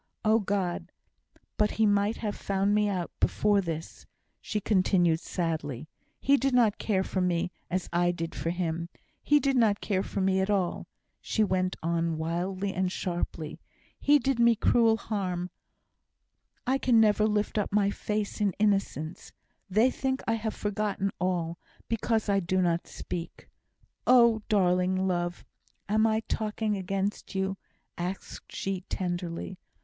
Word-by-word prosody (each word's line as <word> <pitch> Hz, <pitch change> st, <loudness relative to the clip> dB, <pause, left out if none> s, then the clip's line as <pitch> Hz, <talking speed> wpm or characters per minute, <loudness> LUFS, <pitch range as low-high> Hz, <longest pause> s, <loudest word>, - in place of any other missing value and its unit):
"Oh, 220 Hz, +1 st, +5 dB
God! 195 Hz, -4 st, -2 dB, 0.7 s
but 210 Hz, 0 st, +3 dB
he 220 Hz, -, +2 dB
might 205 Hz, +1 st, +2 dB
have 210 Hz, -3 st, -3 dB
found 195 Hz, +1 st, 0 dB
me 210 Hz, 0 st, +3 dB
out 180 Hz, -3 st, -2 dB
before 205 Hz, -1 st, +3 dB
this," 165 Hz, -3 st, -6 dB, 0.3 s
she 215 Hz, -, -2 dB
continued, 185 Hz, -5 st, +2 dB
sadly. 155 Hz, -7 st, -3 dB, 0.3 s
"He 280 Hz, +1 st, +4 dB
did 270 Hz, 0 st, +1 dB
not 225 Hz, -4 st, +3 dB
care 190 Hz, -4 st, +1 dB
for 185 Hz, -, -2 dB
me, 180 Hz, -1 st, 0 dB, 0.2 s
as 185 Hz, 0 st, -1 dB
I 175 Hz, +1 st, +3 dB
did 165 Hz, -2 st, -3 dB
for 165 Hz, -, -3 dB
him. 170 Hz, -1 st, -2 dB, 0.3 s
He 295 Hz, 0 st, +4 dB
did 275 Hz, 0 st, +1 dB
not 220 Hz, -4 st, +3 dB
care 190 Hz, -3 st, 0 dB
for 200 Hz, -, -4 dB
me 190 Hz, 0 st, +2 dB
at 190 Hz, +1 st, 0 dB
all," 190 Hz, -4 st, 0 dB, 0.3 s
she 220 Hz, -, +1 dB
went 185 Hz, -2 st, 0 dB
on 165 Hz, -1 st, 0 dB
wildly 185 Hz, +4 st, -2 dB
and 185 Hz, 0 st, 0 dB
sharply. 170 Hz, -4 st, -4 dB, 0.4 s
"He 295 Hz, +1 st, +5 dB
did 270 Hz, -2 st, 0 dB
me 235 Hz, -1 st, +6 dB
cruel 225 Hz, 0 st, +4 dB
harm. 185 Hz, -5 st, -3 dB, 1.1 s
I 265 Hz, +2 st, +1 dB
can 240 Hz, -4 st, +4 dB
never 215 Hz, -1 st, +4 dB
again 215 Hz, -1 st, +1 dB
lift 210 Hz, +1 st, 0 dB
up 205 Hz, -, -2 dB
my 200 Hz, 0 st, +3 dB
face 210 Hz, +1 st, -3 dB
in 200 Hz, -3 st, +2 dB
innocence. 195 Hz, -6 st, -1 dB, 0.4 s
They 220 Hz, +7 st, +4 dB
think 265 Hz, 0 st, -2 dB
I 225 Hz, -, +2 dB
have 220 Hz, -1 st, -2 dB
forgotten 205 Hz, -1 st, -1 dB
all, 175 Hz, -2 st, -1 dB, 0.3 s
because 225 Hz, 0 st, 0 dB
I 200 Hz, -1 st, +3 dB
do 185 Hz, +1 st, 0 dB
not 170 Hz, -2 st, +1 dB
speak. 170 Hz, -1 st, -7 dB, 0.6 s
Oh, 235 Hz, -3 st, +6 dB
darling 185 Hz, -1 st, +2 dB
love! 175 Hz, -1 st, -2 dB, 0.4 s
am 215 Hz, +2 st, +3 dB
I 220 Hz, 0 st, +1 dB
talking 215 Hz, -1 st, -2 dB
against 195 Hz, +1 st, -3 dB
you?" 190 Hz, 0 st, 0 dB, 0.4 s
asked 180 Hz, +2 st, -5 dB
she, 195 Hz, -1 st, -3 dB
tenderly. 175 Hz, 0 st, -3 dB
195 Hz, 155 wpm, -28 LUFS, 180-215 Hz, 1.1 s, me